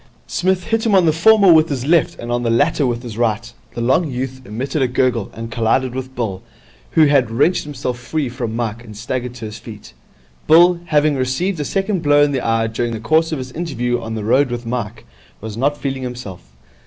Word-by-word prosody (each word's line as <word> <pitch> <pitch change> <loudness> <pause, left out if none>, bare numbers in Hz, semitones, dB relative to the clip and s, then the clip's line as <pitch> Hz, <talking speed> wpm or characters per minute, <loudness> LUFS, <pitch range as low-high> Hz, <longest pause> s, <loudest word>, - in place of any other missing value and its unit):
Psmith 185 0 0
hit 225 +2 -1
him 210 - +3
on 185 -2 +5
the 160 - +3
former 195 +2 +6
with 160 0 +4
his 135 -3 -3
left 165 +1 +2
and 120 0 -6
on 120 0 0
the 120 - -1
latter 145 +4 +2
with 120 0 -3
his 115 -2 -7
right. 120 0 -1 0.2
The 120 - -3
long 135 +7 +2
youth 130 0 -4
emitted 130 +7 -3
a 130 - +3
gurgle, 125 -4 0
and 115 0 -8
collided 120 +3 0
with 130 0 -6
Bill, 100 -6 -3 0.5
who 160 - +6
had 140 -5 +3
wrenched 145 +11 +1
himself 125 -4 -4
free 145 +3 -2
from 120 -2 -4
Mike 115 -1 -3
and 110 -3 -11
staggered 125 +2 -4
to 115 -3 -7
his 110 +1 -8
feet. 105 - -11 0.5
Bill, 170 +2 +6
having 150 -3 +2
received 145 +8 -1
a - - -1
second 195 0 -1
blow 145 -1 +4
in 145 - +2
the 135 -2 -1
eye 115 -1 +1
during 115 +1 -2
the 110 - -4
course 160 +9 +2
of 155 - -1
his 130 -1 -7
interview 125 -7 -2
on 110 0 -5
the 110 - -4
road 130 +5 +3
with 120 0 -5
Mike, 115 -2 -4 0.3
was 110 -1 -7
not 140 +5 0
feeling 135 -2 -3
himself. 125 - -7
125 Hz, 220 wpm, -18 LUFS, 115-150 Hz, 0.5 s, former